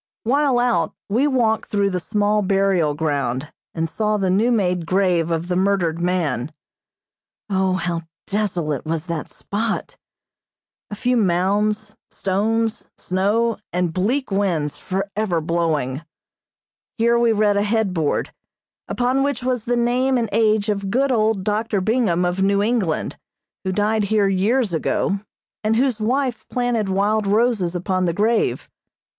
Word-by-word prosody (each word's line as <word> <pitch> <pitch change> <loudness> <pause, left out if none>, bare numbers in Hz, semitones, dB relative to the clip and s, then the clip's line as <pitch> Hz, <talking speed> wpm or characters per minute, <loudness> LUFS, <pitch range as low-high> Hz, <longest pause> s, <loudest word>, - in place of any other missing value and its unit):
While 275 +2 +2
out, 235 -10 +1
we 245 +8 +2
walked 235 -5 +1
through 200 -1 +1
the 180 - -1
small 210 +2 +1
burial 195 -6 +2
ground, 145 -3 -2 0.2
and 165 -1 -1
saw 215 +5 0
the 190 -2 0
new 220 +6 +3
made 180 -7 0
grave 180 -3 +2
of 165 +1 -1
the 180 - -1
murdered 185 -3 +1
man. 160 -7 -1 1.0
O, 190 -1 +2
how 175 -2 -2 0.2
desolate 180 - -1
was 160 0 -3
that 170 -4 -4
spot! 220 +2 -3 0.9
A 205 - -5
few 250 +4 0
mounds, 210 +2 +1
stones, 220 +4 -1
snow 210 +5 0
and 175 -1 -1
bleak 235 - 0
winds 175 -7 0
forever 195 -1 -2
blowing. 155 -5 -1 1.0
Here 235 +1 +3
we 235 -1 +3
read 210 -1 +2
a 200 - +2
headboard, 205 -7 0 0.5
upon 250 +2 0
which 275 -3 -1
was 250 -3 -1
the 245 0 +1
name 250 +2 +2
and 230 -3 -1
age 215 -1 +2
of 200 -2 -1
good 265 +6 +1
old 220 -4 +1
Dr. 210 0 0
Bingham 190 -4 +1
of 180 +2 -1
New 200 +1 +2
England, 210 -8 -1 0.4
who 190 - -1
died 210 +2 +1
here 205 -1 +2
years 200 +3 +1
ago, 190 +4 0 0.4
and 215 +1 +2
whose 245 -2 +1
wife 250 +2 -1
planted 245 -5 0
wild 205 +2 +1
roses 210 -4 +1
upon 185 +1 0
the 170 - 0
grave. 220 +5 +1
200 Hz, 140 wpm, -21 LUFS, 180-225 Hz, 1.0 s, new